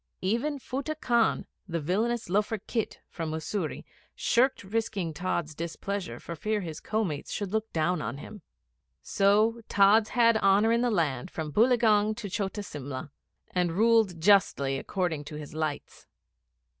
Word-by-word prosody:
Even 235 +10 0
Futteh 280 +4 -4
Khan, 235 -5 +2 0.2
the 170 -2 -2
villainous 220 +9 -1
loafer 210 +4 +1
khit 220 +2 -4
from 165 -2 -5
Mussoorie, 160 +2 -3 0.3
shirked 255 +1 +2
risking 200 -4 -2
Tods' 170 -2 -2
displeasure 175 +5 -4
for 170 - -7
fear 210 +6 -1
his 160 -4 -6
co 220 +1 -1
mates 150 -7 -4
should 200 -3 -3
look 220 +1 -1
down 165 +1 0
on 115 +4 -4
him. 205 +7 -10 0.6
So 215 - +3
Tods 205 +2 +5
had 230 -2 +5
honour 205 +2 +4
in 235 +1 +3
the 245 - +2
land 160 - 0
from 155 -3 -5
Boileaugunge 220 - +4
to 210 -4 -5
Chota 205 +1 -2
Simla, 140 -5 -7 0.4
and 180 -2 0
ruled 220 -3 +3
justly 160 -8 +3
according 175 -5 -2
to 150 - -8
his 150 -1 -8
lights. 155 -2 -4
200 Hz, 150 wpm, -28 LUFS, 160-220 Hz, 0.6 s, Tods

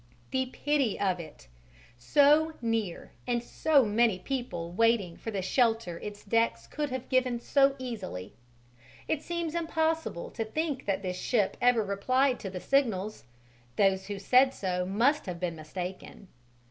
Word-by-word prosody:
The 260 0 0
pity 275 -3 0
of 185 -3 +1
it! 155 - -11 0.5
So 295 - +4
near, 225 -6 -2 0.2
and 240 -1 0
so 285 +1 +3
many 220 -1 +2
people 185 -7 -4
waiting 210 -3 +2
for - - -7
the 195 -4 -3
shelter 225 -5 +1
its 205 0 -8
decks 230 +2 +1
could 295 -1 -3
have 260 0 -5
given 255 -2 +1
so 275 +3 +3
easily. 195 - -6 0.7
It 310 - 0
seems 340 -1 -3
impossible 320 - -1
to 225 - -3
think 290 +3 -3
that 195 0 0
this 180 -1 -3
ship 215 -6 +1
ever 245 -3 +4
replied 255 +7 +1
to 195 - -5
the 185 -1 -6
signals: 215 - 0 0.5
those 190 -1 +2
who 205 -1 -4
said 255 +6 +4
so 180 -2 -2
must 240 +10 +2
have 175 -2 -4
been 175 -2 -2
mistaken. 180 +4 -7
230 Hz, 150 wpm, -29 LUFS, 190-265 Hz, 0.7 s, So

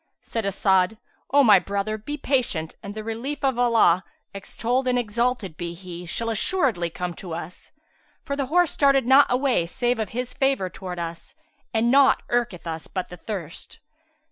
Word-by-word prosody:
Said 225 -3 -3
As'ad, 190 +1 +2 0.3
"O 285 +1 +5
my 210 -6 +7
brother, 200 +3 -2
be 240 +8 -6
patient, 245 - -1
and 200 +1 -8
the 215 - -5
relief 235 +7 -5
of 265 -3 +1
Allah 225 -7 +4 0.3
(extolled 240 +6 -2
and 250 0 +2
exalted 235 -6 -1
be 170 -1 -5
He!) 175 -1 -9
shall 230 +7 -2
assuredly 225 - +1
come 175 +1 -4
to 170 -1 -7
us; 170 +1 -9 0.5
for 280 - -3
the 275 -2 -2
horse 345 +2 +3
started 275 -3 +3
not 270 +3 +6
away 250 -8 +1
save 240 +6 -1
of 215 -3 -2
His 250 +1 -4
favour 270 -10 0
towards 180 -2 -7
us, 165 0 -7 0.4
and 230 +1 +2
naught 275 0 +5
irketh 240 -8 -1
us 160 -1 -5
but 185 -2 -4
this 180 - -10
thirst." 180 -7 -6
220 Hz, 170 wpm, -24 LUFS, 180-255 Hz, 0.5 s, my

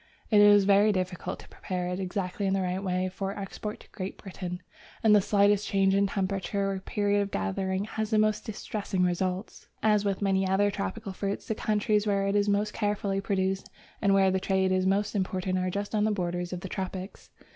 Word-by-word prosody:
It 210 -1 +7
is 205 -1 +7
very 200 +2 +5
difficult 185 -2 -3
to - - -15
prepare 180 -1 -4
it 180 +1 -3
exactly 190 +1 -2
in 190 - +2
the 190 - 0
right 185 +2 -2
way 185 -1 0
for 195 +2 -4
export 205 +2 -6
to - - -17
Great 190 -1 -6
Britain, 180 -2 -7 0.4
and 215 -1 +6
the 205 - +6
slightest 205 +1 +3
change 195 -1 +3
in 200 0 +3
temperature 195 0 -1
or 195 - -3
period 205 +1 0
of 200 - -2
gathering 190 - -1
has 220 0 -3
the 220 - +2
most 215 0 +2
distressing 205 -4 -3
results. 180 +2 -2 0.2
As 210 -1 +4
with 200 -2 -1
many 195 -1 +1
other 200 +2 +2
tropical 190 - -4
fruits, 200 +1 -3
the - - 0
countries 210 0 +1
where 200 -1 +1
it 200 +1 0
is 205 0 +2
most 205 +1 +1
carefully 205 -2 -1
produced 190 -1 -1 0.3
and 200 -2 +4
where 195 -1 +4
the 190 - +1
trade 190 0 +1
is 185 0 +2
most 200 +2 +1
important 185 -2 -1
are 185 0 0
just 200 +3 -4
on 210 -1 +2
the 215 - +2
borders 175 -2 -2
of 180 -1 -4
the 190 - -5
tropics. 190 +1 -6
195 Hz, 210 wpm, -28 LUFS, 185-205 Hz, 0.4 s, It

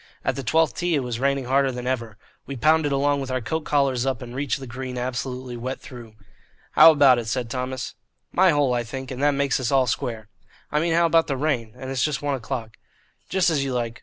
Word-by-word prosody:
At - - +1
the 135 - -4
twelfth 155 +2 +1
tee 175 -2 +1
it 140 - 0
was 120 -2 -4
raining 140 0 0
harder 135 +1 +2
than 125 0 -6
ever. 115 -4 -3 0.3
We 140 - -5
pounded 155 +2 +3
along 140 +1 +1
with 135 - -5
our 130 0 -1
coat 160 +6 -3
collars 135 -4 +1
up 135 -1 -2
and 120 0 -9
reached 140 0 -1
the 135 - -7
green 125 +1 -6
absolutely 125 0 -4
wet 130 +3 -5
through. 120 -4 -12 0.6
"How - - +9
about 140 -5 +6
it?" 115 - -5
said 120 0 -2
Thomas. 130 0 -4 0.4
"My 190 +1 +4
hole, 145 -5 +2
I 120 -1 0
think, 130 +3 -7
and 130 +1 -5
that 145 0 +3
makes 140 -1 +1
us 130 0 -1
all 135 -2 +4
square." 115 -3 -3 0.4
"I 150 - +2
mean 165 +1 +1
how 170 0 +4
about 165 0 +3
the 135 - -2
rain? 130 -6 -1
And 130 0 -7
it's 130 -2 -1
just 150 -3 0
one 145 -1 0
o'clock." 115 -3 -5 0.5
"Just 185 -2 +2
as 145 -3 +1
you 135 -2 -2
like. 120 0 -3
130 Hz, 235 wpm, -24 LUFS, 125-145 Hz, 0.6 s, How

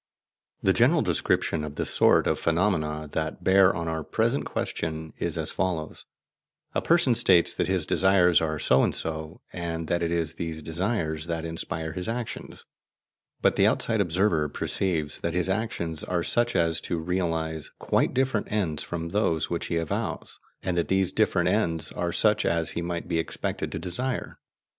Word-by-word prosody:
The - - +4
general - - +4
description 80 -2 0
of 75 -1 -6
the - - -2
sort - - +4
of - - 0
phenomena 80 -4 0
that 80 -1 -3
bear 95 0 +5
on 85 -1 -3
our 80 -1 -2
present - - 0
question 80 -1 -4
is - - -1
as - - +1
follows: 85 -4 -3 0.7
A - - 0
person 165 -7 +3
states 95 -7 +5
that - - -1
his - - +1
desires 90 -4 +4
are 80 -1 -1
so 65 -2 +3
and - - 0
so, 80 -1 -5
and 85 -2 -4
that 85 - +1
it 85 -1 0
is 85 -2 0
these 80 -1 -5
desires 80 -2 -2
that 85 -1 -3
inspire 80 -1 -4
his 90 +4 -5
actions; 120 0 -6 0.8
but - - +3
the - - +5
outside 110 -2 +2
observer 85 -4 +1
perceives 80 -1 -2
that 85 0 -2
his 90 +1 +1
actions 95 -6 -2
are 90 -2 -1
such 120 +5 +1
as 85 -1 +1
to 85 - -2
realize 80 -2 -2
quite - - +1
different 130 -4 0
ends 90 -8 -1
from 85 -1 -4
those 85 -5 0
which 85 - -2
he 85 - -1
avows, 80 -2 -3 0.2
and 90 -1 -1
that 85 - +1
these 95 -1 +2
different 100 -4 +2
ends 85 -5 0
are 85 -1 -2
such 105 +3 +2
as 85 -1 +2
he 85 - -3
might 85 0 -4
be 85 -2 0
expected 80 - -3
to - - -4
desire. 125 +8 -3
85 Hz, 175 wpm, -26 LUFS, 80-95 Hz, 0.8 s, bear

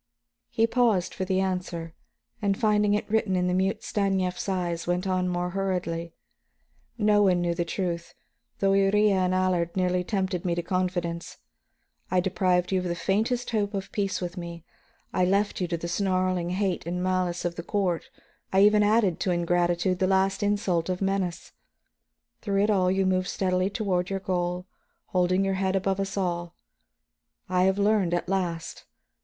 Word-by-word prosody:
He 225 - +2
paused 230 -6 +2
for 190 - -3
the 190 0 +1
answer, 180 -3 -3 0.5
and 200 -1 +1
finding 210 -3 +3
it 210 - -2
written 215 -3 +1
in 180 0 +1
the 180 - +1
mute 190 +2 0
Stanief's 195 -2 -1
eyes, 175 -3 -2
went 175 +2 0
on 185 -1 0
more 180 0 -2
hurriedly. 175 -3 -2 0.8
"No 210 -2 +4
one 185 -3 +4
knew 175 -1 0
the 170 0 -1
truth, 170 -1 -3 0.4
although 195 0 +3
Iría 205 +2 +4
and 185 -1 +2
Allard 180 -2 0
nearly 180 -1 +1
tempted 190 -3 -2
me 175 -2 0
to 175 - -2
confidence. 175 -1 -2 0.7
I 185 - +2
deprived 180 -1 +1
you 190 - +2
of 180 - -4
the 175 -1 -1
faintest 220 +8 0
hope 205 -2 0
of 195 0 -4
peace 200 -2 -1
with 180 +1 -5
me, 170 -2 -7 0.5
I 185 - +2
left 200 +2 +1
you 180 - 0
to 170 -1 -2
the 170 - -5
snarling 185 -1 0
hate 185 -2 -1
and 180 +1 -2
malice 185 -2 0
of 175 - 0
the 170 - -6
court; 180 -2 -1 0.4
I 190 - +4
even 210 0 +5
added 205 -4 +3
to 180 - 0
ingratitude 175 +1 +1
the 185 - +2
last 190 0 +2
insult 195 -5 0
of 185 +1 -1
menace. 195 -3 -2 0.9
Through 200 -1 +1
it 210 - +2
all 185 -3 +3
you 190 +1 +1
moved 185 -1 +1
steadily 185 0 0
toward 195 -5 -1
your 195 0 -2
goal, 180 -1 -2 0.4
holding 185 +1 +2
your 195 - +1
head 190 0 +1
above 195 0 0
us 195 +1 -3
all. 175 -2 -2 0.9
I 185 0 +2
have 190 +1 +2
learned, 200 -4 +2
at 175 - -2
last. 175 -3 -3
185 Hz, 175 wpm, -26 LUFS, 175-195 Hz, 0.9 s, even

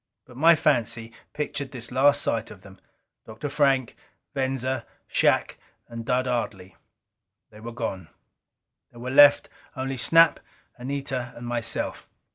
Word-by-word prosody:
But 125 - -16
my 165 +5 +6
fancy 115 -6 0 0.2
pictured 145 -2 -4
this 125 -2 -7
last 145 +3 +4
sight 115 -1 -1
of 100 - -13
them, 95 0 -15 0.5
Dr. 115 +6 -6
Frank, 135 -4 +1 0.4
Venza, 130 -2 -2 0.2
Shac - - +1 0.3
and 115 -1 -7
Dud 125 +2 0
Ardley. 105 -6 -3 0.8
They 105 - -14
were 115 +2 -8
gone. 100 -7 -5 0.8
There 120 - -15
were 125 +2 -5
left 145 +1 +7 0.3
only 135 0 -4
Snap, 165 +6 +5 0.4
Anita 130 -1 -4
and 120 - -9
myself. 120 -1 -3
125 Hz, 130 wpm, -25 LUFS, 115-140 Hz, 0.8 s, left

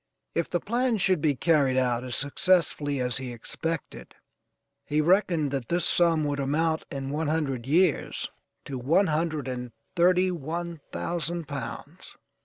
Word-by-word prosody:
If 170 - -1
the 175 - 0
plan 240 +3 0
should 185 -4 +2
be 145 -2 +2
carried 140 -4 +3
out 125 -2 +1
as 125 -1 -4
successfully 145 -1 +1
as 125 -1 -1
he 130 -2 -5
expected, 160 +8 -5 0.7
he 150 - 0
reckoned 170 -3 +3
that 135 -4 -3
this 175 +1 +1
sum 165 -3 +3
would 145 -1 -1
amount 160 +4 0
in 135 -1 -4
one 155 +2 -1
hundred 140 -6 -1
years 170 +2 +2 0.4
to 135 -2 -5
one 160 +11 +3
hundred 155 -4 -1
and 125 -1 -4 0.2
thirty 180 +1 +4
one 170 +1 -4
thousand 170 -1 -2
pounds. 140 -1 -7
155 Hz, 150 wpm, -27 LUFS, 135-170 Hz, 0.7 s, thirty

